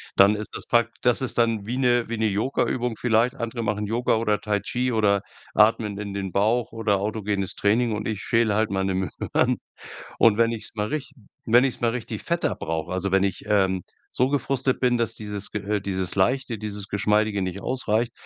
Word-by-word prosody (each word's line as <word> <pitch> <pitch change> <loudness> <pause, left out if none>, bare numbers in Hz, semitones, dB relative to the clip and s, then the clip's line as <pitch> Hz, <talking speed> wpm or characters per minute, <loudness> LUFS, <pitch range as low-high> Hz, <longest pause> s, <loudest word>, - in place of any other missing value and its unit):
dann 100 +2 +6
ist 105 0 -4
das - - -5
prak 120 -1 +2
das 125 +2 +4
ist 130 - -1
dann 115 -3 +1
wie 125 +2 -2
'ne 120 -3 +2
wie 115 - -2
'ne 110 - +1
Yogaübung 115 +2 0
vielleicht. 120 +2 +2
Andere 115 -1 -4
machen 105 0 -1
Yoga 115 +2 +1
oder 105 -2 0
Tai 105 -2 -1
Chi 125 +4 -1
oder 100 -3 +2 0.3
atmen 105 -1 +3
in 100 -1 -5
den 95 -2 -4
Bauch 110 +4 +1
oder 110 -3 0
autogenes 100 -2 -2
Training 110 +2 +1
und 105 - -4
ich 105 -3 -3
schäle 115 -3 +2
halt 110 -1 +1
meine 95 -1 0
Möhren. 95 -4 0 0.6
Und 110 -3 +5
wenn 115 0 +4
ich's 115 -2 -4
mal 105 0 -2
rich 155 -3 -4 0.3
wenn 120 +2 +5
ich's 135 - -2
mal 120 -1 +2
richtig 115 -3 -5
fetter 170 0 0
brauche, 80 +2 -4
also 95 +1 -2
wenn 95 0 +4
ich, 100 -2 -2
ähm, 95 -3 +2 0.3
so 125 - +2
gefrustet 135 -2 0
bin, 125 -2 +2
dass 115 - 0
dieses, 105 -2 -3
äh 105 0 -1
dieses 95 -2 +1
Leichte, 120 +3 +1
dieses 105 -1 -4
Geschmeidige 105 0 +1
nicht 95 +1 -4
ausreicht, 120 -1 -1
110 Hz, 195 wpm, -24 LUFS, 100-120 Hz, 0.6 s, dann